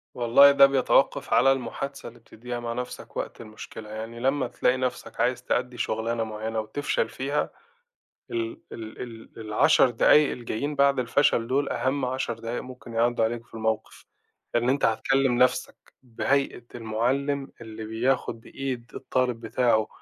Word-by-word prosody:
والله، 125 +4 +7
ده 140 0 +8
بيتوقَّف 135 -1 +2
على 135 - +6
المحادثة 135 +2 -4
اللي 120 +1 -17
بتديها 120 +1 -7
مع 120 -1 -4
نَفْسك 125 +1 -7
وقت - - -5
المشكلة. 110 -1 -10
يعني 110 +2 -7
لمّا 135 +2 +1
تلاقي 125 +1 +1
نَفْسك 125 -3 -4
عايز 125 +1 +1
تأدِّي 125 0 -1
شغلانة 115 +1 -1
معيَّنة 110 0 -4
وتفشل 110 +1 -1
فيها، 140 +4 -2 0.8
ال 340 -2 -3
ال 110 -1 -7
ال 115 -2 -10
ال10 110 +5 +4
دقايق 145 +5 +5
الجايين 125 +4 -3
بعد 140 -1 +3
الفشل 120 -1 +2
دول، 140 +3 +1
أهم 135 +1 -1
10 125 -1 -2
دقايق 115 +1 -4
ممكن 125 -2 -11
يعدُّوا 115 0 +2
عليك 115 +1 -3
في - - -20
الموقف، 110 -1 -3 0.5
لأن 120 +1 +2
أنت 135 +2 +2
هتكلِّم 135 +4 +2
نَفْسك، 125 0 +2 0.3
بهيئة 130 +1 -1
المُعلِّم 130 +5 -1
اللي 110 -1 -8
بياخد 115 +2 -1
بإيد 125 -1 -5
الطالب 125 -2 -1
بتاعه 115 -1 +1
120 Hz, 145 wpm, -26 LUFS, 115-135 Hz, 0.8 s, ده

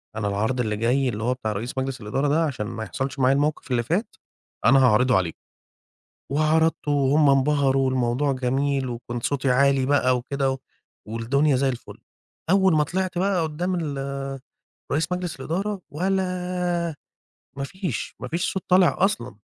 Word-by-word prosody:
أنا 110 -1 -2
العرض 110 +6 -1
اللي 105 -2 -1
جاي 125 +4 +1
اللي 110 -1 -4
هو 125 - +1
بتاع 120 -4 -3
رئيس 110 +6 -5
مجلس 130 -1 -3
الإدارة 130 +7 -1
ده، 155 +3 +2
عشان 125 -8 -3
ما 115 -1 -5
يحصلش 135 +4 -4
معايا 130 +1 +4
الموقف 145 -1 -1
اللي 120 -1 +2
فات، 190 - -2 0.5
أنا 135 +3 +6
هاعرضه 125 +2 +4
عليكم، 85 -3 -2 1.0
وعرضته 155 +1 +2
وهم 145 +1 +4
انبهروا 135 -1 +3
والموضوع 130 +2 +1
جميل، 135 +1 0
وكنت 120 0 -5
صوتي 140 -2 0
عالي 135 +1 +3
بقى 130 -3 +3
وكده، 135 +2 -1
و 130 - -2 0.5
والدنيا 130 +6 +1
زي 135 +1 +2
الفُلّ 125 -2 -6 0.5
أول 190 -2 +4
ما 150 - +3
طلعت 185 +2 -2
بقى 190 -2 +1
قدّام 175 +4 -2
ال 135 -2 -4 0.5
رئيس 160 +5 0
مجلس 180 -5 -3
الإدارة، 190 +7 -2
ولا 180 -1 -1 0.6
ما 140 - -3
فيش 175 - -4
ما 130 - -5
فيش 170 +6 -1
صوت 190 - -3
طالع 185 -1 +5
أصلًا. 120 - -1
140 Hz, 160 wpm, -24 LUFS, 125-160 Hz, 1.0 s, أنا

